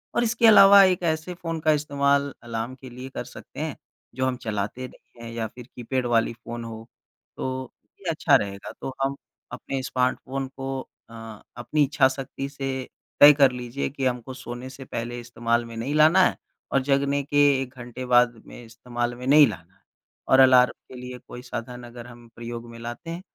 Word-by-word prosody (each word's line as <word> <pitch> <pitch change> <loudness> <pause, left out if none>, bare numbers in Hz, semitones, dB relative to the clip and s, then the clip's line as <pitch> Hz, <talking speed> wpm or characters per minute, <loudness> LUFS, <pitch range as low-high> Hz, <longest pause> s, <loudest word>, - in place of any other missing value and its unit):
और - - +3
इसके 235 0 +3
अलावा 200 -2 +9
एक 185 -1 +2
ऐसे 160 +1 -1
फ़ोन 165 -2 -5
का 155 0 +3
इस्तेमाल 140 -1 +1
अलार्म 115 +2 -4
के 130 -1 -12
लिए 125 +2 -9
कर - - -5
सकते - - -12
हैं, - - -3 0.4
जो 130 0 0
हम 130 -1 -1
चलाते 110 +4 -3
नहीं 120 -1 -18
हैं 115 - -7
या 115 -1 -3
फिर 120 +1 -13
कीपैड 125 +1 -2
वाली 115 -1 +1
फ़ोन 120 +1 -8
हो, 115 0 -9 0.5
तो 130 -1 -4 0.3
ये 185 - -3
अच्छा 160 - +3
रहेगा। 100 -1 -2
तो 135 - -5
हम 135 +1 0 0.4
अपने 135 -1 -4
स्मार्टफ़ोन 130 +1 -1
को 135 0 -4 0.3
अ, - - -14 0.4
अपनी 145 +5 +1
इच्छा 140 -1 +3
शक्ति 135 +1 -5
से 140 -1 -6 0.5
तय 145 +1 +10
कर 140 -3 +6
लीजिए 125 +2 -4
कि 135 -1 -4
हमको 125 0 -2
सोने 125 0 -8
से 130 0 -11
पहले 120 +1 -5
इस्तेमाल 120 0 -1
में 115 0 -10
नहीं 125 +6 -3
लाना 155 +4 +6
है - - 0 0.3
और 135 - +2
जगने 140 +1 +1
के 145 +1 -2 0.2
1 130 0 -6
घंटे 125 +1 -7
बाद 120 -1 +5
में 120 - -12
इस्तेमाल 120 +1 -4
में 125 +1 -9
नहीं 145 +1 +7
लाना 90 -4 -8
है। - - -33 0.5
और 130 - +5
अलार्म 130 -1 +7 0.2
के - - -11
लिए 125 0 -8
कोई 125 - -9
साधन 125 0 -7
अगर 120 0 -10
हम 120 -1 -14
प्रयोग 120 0 -7
में 115 - -11
लाते 120 +8 -7
हैं, 170 +2 -5
130 Hz, 195 wpm, -25 LUFS, 120-140 Hz, 0.5 s, तय